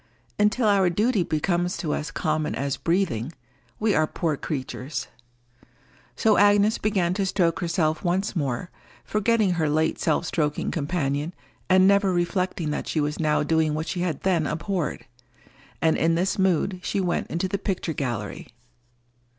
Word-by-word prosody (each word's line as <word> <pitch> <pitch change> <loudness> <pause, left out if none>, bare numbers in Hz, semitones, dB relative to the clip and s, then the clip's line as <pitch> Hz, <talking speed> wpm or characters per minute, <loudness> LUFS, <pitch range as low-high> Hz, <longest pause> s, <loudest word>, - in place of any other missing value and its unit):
Until 210 +3 +3
our 195 -3 +4
duty 210 +4 +1
becomes 175 +2 0
to 155 -5 -2
us 150 - -3
common 155 -1 -1
as 140 0 -1
breathing, 165 - -1 0.5
we 215 -1 +2
are 155 -2 +2
poor 160 -2 -1
creatures. 135 -2 -4 1.1
So 220 -2 +3
Agnes 205 +2 +4
began 190 -4 +1
to 200 +1 -1
stroke 175 -4 +1
herself 165 -2 0
once 190 +3 0
more, 140 +1 -2 0.3
forgetting 215 -1 +2
her 160 -4 0
late 155 +2 +1
self 160 +1 +1
stroking 150 -3 -1
companion, 145 0 -2 0.3
and 185 0 +6
never 200 -1 +4
reflecting 175 -2 -1
that - - -3
she 160 - -1
was 150 0 -1
now 155 -2 +2
doing 160 0 +1
what 160 +2 -3
she 180 - -3
had 175 -5 -2
then 170 -5 +1
abhorred. 165 +2 -3 0.8
And 160 -1 +4
in 165 +1 +2
this 185 +3 0
mood 190 0 +1
she 200 - -2
went 180 -2 -1
into 170 +3 -1
the 200 +1 -2
picture 185 -4 -2
gallery. 120 -8 -4
170 Hz, 155 wpm, -25 LUFS, 155-190 Hz, 1.1 s, and